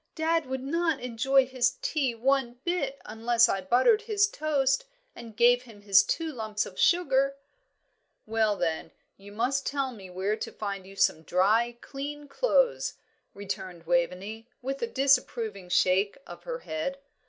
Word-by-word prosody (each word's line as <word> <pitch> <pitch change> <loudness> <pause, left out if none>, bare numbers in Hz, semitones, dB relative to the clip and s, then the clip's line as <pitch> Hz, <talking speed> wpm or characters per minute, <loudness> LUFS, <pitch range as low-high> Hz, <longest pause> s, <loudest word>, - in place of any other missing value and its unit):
"Dad 325 -2 +1
would 260 0 -4
not 325 +1 0
enjoy 255 +3 +2
his 255 0 0
tea 270 -6 0
one 260 +1 +1
bit 285 -6 -2
unless 230 +1 +3
I 195 - -1
buttered 255 - +3
his 420 -2 +2
toast 285 - 0 0.3
and 225 -2 -11
gave 245 +1 +5
him 225 -5 -15
his 195 -1 +6
two 320 +10 -2
lumps 215 -3 -2
of 185 - -10
sugar." 275 -6 +3 0.9
"Well, 220 -1 +1
then, 165 -3 -2 0.2
you 200 +1 -14
must 250 +6 -1
tell 275 -2 -1
me 195 -6 -11
where 190 +4 -1
to - - -6
find 200 -3 -5
you 195 - -12
some 160 -4 +2
dry, 215 +9 +2
clean 290 +1 -7
clothes," - - +1 0.4
returned 190 -4 -6
Waveney, 180 +6 -1
with 270 +2 -4
a 470 - 0
disapproving 235 - +1
shake 190 +5 +2
of - - -11
her - - -3
head. 315 - -3
245 Hz, 155 wpm, -28 LUFS, 205-275 Hz, 0.9 s, his